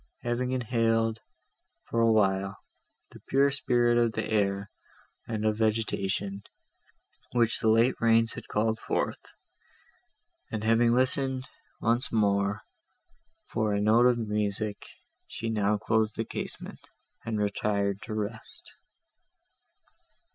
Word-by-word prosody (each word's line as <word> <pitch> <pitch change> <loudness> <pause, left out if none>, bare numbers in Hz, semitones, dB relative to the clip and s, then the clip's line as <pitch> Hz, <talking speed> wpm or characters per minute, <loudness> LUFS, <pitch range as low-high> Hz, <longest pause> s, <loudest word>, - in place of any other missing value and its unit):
Having 125 +2 -1
inhaled, 115 -2 +1 0.7
for 115 - -1
a 115 0 +4
while, 100 -2 +1 0.5
the - - -13
pure 140 +1 +4
spirit 120 -3 +2
of 115 -2 +2
the - - -2
air, 100 -1 0 0.6
and 110 -2 -3
of 110 0 +1
vegetation, 100 -3 -1 0.9
which 115 -2 +2
the - - 0
late 115 +3 +4
rains 115 0 +3
had - - -9
called 110 +1 0
forth; - - -3 1.2
and 110 -1 -3
having 115 +1 +4
listened, 130 +1 +1 0.3
once 120 +2 +1
more, 100 -2 +1 0.8
for 105 -2 -1
a - - 0
note 110 +4 +5
of 125 -1 +3
music, 105 -1 -2 0.4
she 115 0 -4
now 105 -1 +1
closed 110 0 0
the 115 - -2
casement, - - -6 0.3
and 110 -1 -3
retired 100 -1 -1
to 110 0 -6
rest. 110 +1 -6
110 Hz, 120 wpm, -28 LUFS, 105-115 Hz, 1.2 s, note